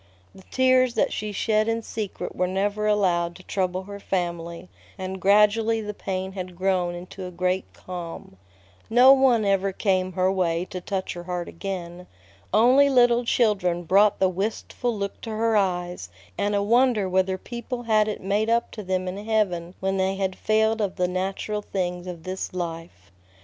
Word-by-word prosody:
The - - -14
tears 255 -1 +3
that - - +1
she 215 0 -3
shed 215 +2 +1
in 230 0 -1
secret 215 -3 -5
were 180 - +1
never 205 +3 -1
allowed 175 -5 +1
to 185 - -13
trouble 185 -1 -2
her 200 +1 -9
family, 170 -2 -3 0.3
and 190 0 -5
gradually 210 +3 +4
the 210 -1 -5
pain 190 -1 -4
had 185 -2 -7
grown 180 -1 0
into 180 +1 -8
a - - -6
great 180 +1 -1
calm. 170 - -8 0.5
No 250 +4 +8
one 255 -5 +3
ever 195 0 +2
came 185 -1 0
her 185 +1 +2
way 175 -2 0
to 185 - -5
touch 190 0 -3
her 175 0 -8
heart 180 -1 -3
again. 180 -1 -6 0.4
Only 255 +7 +5
little 245 -2 +4
children 190 -8 +1
brought 200 +4 +4
the 190 - +3
wistful 215 +4 -3
look 200 0 -4
to 230 - -7
her 220 +1 +1
eyes, 180 - -1 0.3
and 205 - 0
a 200 - +1
wonder 235 -2 +3
whether 190 0 +1
people 240 +4 -6
had 215 -2 +3
it 210 - -4
made 205 +3 0
up 235 +1 +1
to 215 - -7
them 185 -1 -2
in 195 +3 -5
heaven 190 -6 0
when 195 0 0
they 190 0 +1
had 190 -1 -2
failed 220 +1 +1
of 200 -3 -1
the 180 -1 +1
natural 195 +3 -2
things 180 -3 -3
of 170 -3 -7
this 185 0 -5
life. 165 - -6
195 Hz, 175 wpm, -25 LUFS, 180-215 Hz, 0.5 s, No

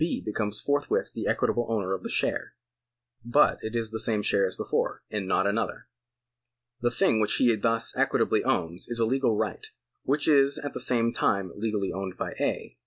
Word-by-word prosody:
becomes 105 0 -2
forthwith 145 0 0
the - - -4
equitable 120 - 0
owner 100 -4 -1
of 95 - -3
the - - -6
share; - - 0 0.7
but 120 +6 +3
it 110 +2 -5
is 115 -1 -1
the 110 - -4
same 110 -2 +1
share 100 -1 +2
as 95 - -5
before, - - -2
and 105 -3 -3
not 95 0 +2
another. 105 +3 -1 1.0
The 120 - +2
thing 110 - +2
which 105 - +1
he 120 -3 +3
thus 115 +2 0
equitably - - +2
owns 85 0 -1
is 120 - -3
a 115 - +3
legal 125 -2 +1
right, - - -2 0.3
which 140 +2 0
is 140 -2 +5
at 145 - -5
the - - -5
same 115 -1 +2
time 95 -3 0
legally 105 -2 -2
owned 95 -1 -5
by - - -3
A. - - -3
110 Hz, 185 wpm, -27 LUFS, 100-120 Hz, 1.0 s, is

